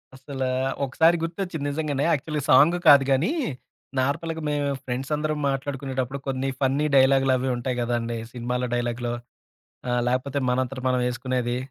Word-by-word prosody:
అస్సల 135 0 -6 0.4
ఒకసారి 160 +6 +3
గుర్తొచ్చింది. 165 -3 -3
నిజంగానే, 145 -2 -1
యాక్చువల్‍గా 150 -1 -1
సాంగ్ 150 +7 +6
కాదు 140 -2 +9
గానీ, 140 - +2 0.7
నార్మల్‍గా 160 +5 -1
మేము 145 -1 0 0.2
ఫ్రెండ్స్ 130 +2 -4
అందరం 155 0 -2
మాట్లాడుకునేటప్పుడు. 135 -1 -3
కొన్ని 135 0 -1
ఫన్నీ 140 +3 +2
డైలాగ్‍లు 135 0 +5
అవి 130 +1 -1
ఉంటాయి 125 +1 -3
గదండీ! 120 -1 -1 0.2
సినిమాలో 125 +1 -2
డైలాగ్‍లో 120 0 -2 0.8
ఆహ్, 125 0 +1
లేపోతే, 130 +3 -1
మనంతట 130 +1 -1
మనం 125 0 +1
ఏసుకునేది. 125 -1 -2
135 Hz, 135 wpm, -25 LUFS, 125-145 Hz, 0.8 s, కాదు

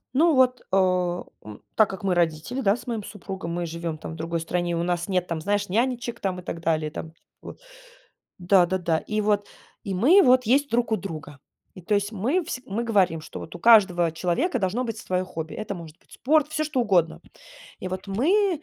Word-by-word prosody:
Ну 320 +1 +4
вот, 255 -1 +3
а, 180 -2 +1 0.2
м, 105 -1 -11
так 215 -2 +4
как 190 -1 -7
мы 190 -2 +1
родители, 170 - -1
да, 200 -1 +3
с - - -11
моим 230 -4 -3
супругом, 190 -4 -7
мы 175 0 -2
живем 165 -1 -4
там 160 - -8
в - - -8
другой 165 +1 -3
стране, 175 +1 -2
у 170 - -1
нас 175 0 -1
нет, 180 -2 0
там, 160 -2 -3
знаешь, 205 +2 -1
нянечек 240 +2 -1
там 185 -2 -2
и 180 - -11
так 165 - -5
далее, 160 -2 0
и 150 - -23
там. 160 0 -7 0.3
Вот - - -10 0.8
Да 180 0 +4
да 190 +2 -1
да, 165 -2 0
и 215 0 -2
вот, 205 -1 +1 0.4
и 195 -2 -3
мы 300 - +6
вот 255 0 +5
есть 280 +5 +3
друг 235 0 0
у - - +3
друга. 155 -7 -8 0.4
И 185 - -11
то 210 +4 0
есть 205 +1 0
мы 250 - 0
всег 255 -6 -6
мы 210 +4 -2
говорим, 195 -8 +2
что - - -9
вот 160 - -9
у 175 - -9
каждого 190 -7 +5
человека 190 - 0
должно 200 +6 -1
быть 225 -2 -4
свое 185 -1 -2
хобби. 160 -3 -6
Это 205 -1 -5
может 165 0 -11
быть - - -32
спорт, 300 +2 +2
всё 310 0 -1
что 300 -4 -1
угодно. 175 - +2 0.6
И - - -6
вот 185 +2 -6
мы 330 - +1
195 Hz, 220 wpm, -25 LUFS, 170-235 Hz, 0.8 s, мы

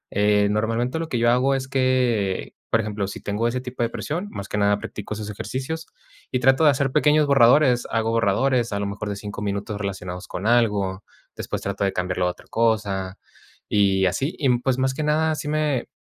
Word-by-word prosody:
Eh, 105 0 +3
normalmente 115 +7 0
lo 165 -1 -4
que 125 - -1
yo 120 0 +3
hago 130 +3 +2
es 130 -1 -3
que, 125 - 0 0.2
por 115 - +3
ejemplo, 105 -2 -3
si 100 - -7
tengo 105 +3 -1
ese 125 +1 -2
tipo 125 -1 -6
de 115 - +1
presión, 170 - -4
más 100 - -7
que 105 - -2
nada 100 0 +3
practico 105 0 -6
esos 105 -1 -6
ejercicios 130 +9 -5 0.4
y 125 - 0
trato 135 +4 +4
de - - +8
hacer 135 -1 +1
pequeños 150 +2 +4
borradores. 135 -1 +4
Hago 115 0 0
borradores 115 +2 +1
a 100 - -1
lo 100 - -2
mejor 105 +1 -4
de 100 - -3
5 105 0 -7
minutos 100 0 -3
relacionados 90 -2 -5
con 95 - -6
algo, 105 -5 +1 0.3
después - - -5
trato 100 0 -2
de 95 - +1
cambiarlo 90 0 -1
a - - +2
otra 90 - -16
cosa, 100 -4 0 0.5
y 95 -2 +3
así. 135 - -1
Y 135 -3 +1
pues 130 0 0
más 130 0 +1
que 140 - -4
nada 155 +1 +2
sí 150 0 -5
me, 150 -4 0
115 Hz, 205 wpm, -23 LUFS, 100-130 Hz, 0.5 s, de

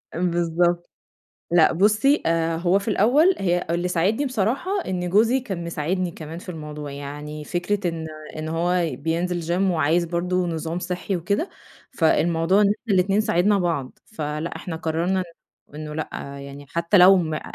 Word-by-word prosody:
بالضبط، 175 0 +1 0.6
لأ، 170 -2 +5
بُصّي، 215 - +3
آآ، 165 0 +1
هو 175 +3 +2
في 200 - -10
الأول 275 - +4
هي 175 -2 0
اللي 175 +1 0
ساعدني 190 - +1
بصراحة 255 - -1
إن 180 -1 -2
جوزي 225 +7 +4
كان 195 -9 -5
مساعدني 170 +2 -2
كمان 160 +2 -8
في 185 - -11
الموضوع، 150 -3 -7
يعني 145 +2 -7
فكرة 180 +3 -1
إن 160 -1 -5 0.3
إن 155 0 -4
هو 170 +1 +1
بينزل 170 +4 -1 0.2
gym 190 0 +2
وعايز 165 +2 +2
برضو 180 +1 -1
نظام 165 +1 -3
صحّي 180 +2 -3
وكده، 200 - -1 0.4
فالموضوع 170 -1 +2
إن 200 - +5
إحنا 210 +1 -1
الاتنين 195 +3 +3
ساعدنا 205 -1 +2
بعض، 165 -7 -2
فلأ 155 -4 -4
إحنا 175 - -5
قررنا 165 +4 -1
إن 170 -4 -12
إنه 150 0 -6
لأ 155 - -3 0.3
يعني 140 +1 -9
حتى 170 +5 +2
لو 185 +1 +8
ما 160 -3 -2
175 Hz, 155 wpm, -23 LUFS, 160-195 Hz, 0.6 s, لو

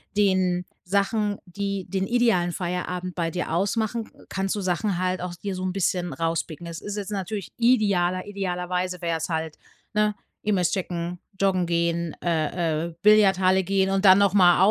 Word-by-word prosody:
den 185 -3 +2 0.2
Sachen, 205 +2 +1
die 200 +1 -3
den 190 -1 -1
idealen 230 -8 +2
Feierabend 180 0 -3
bei 165 -2 -1
dir 180 -3 -3
ausmachen, 220 +5 0
k - - -20 0.2
kannst 195 +1 -1
du 205 - -3
Sachen 185 +1 0
halt 185 0 0
auch 180 -1 -4
dir 195 +2 -5
so 185 - -4
'n 185 -1 -1
bisschen 180 -3 0
rauspicken. 165 +2 -3
Es 165 0 -6
ist 205 0 -5
jetzt 205 0 -4
natürlich 200 -1 -4
idealer 200 -7 +2
idealerweise 180 -2 -3
wär's 165 -1 -2
halt, 160 -2 -3 0.4
ne, 210 0 +2 0.3
E-Mails 190 -5 +1
checken, 175 -2 -3 0.2
joggen 185 -2 +2
gehen, 170 -1 0
äh, 160 -1 0
äh, 170 - -9
Billardhalle 190 -3 +5
gehen 190 +1 +1
und 195 0 +1
dann 190 0 +9
noch 200 -2 +3
mal. 180 -3 +6
185 Hz, 165 wpm, -25 LUFS, 175-200 Hz, 0.4 s, dann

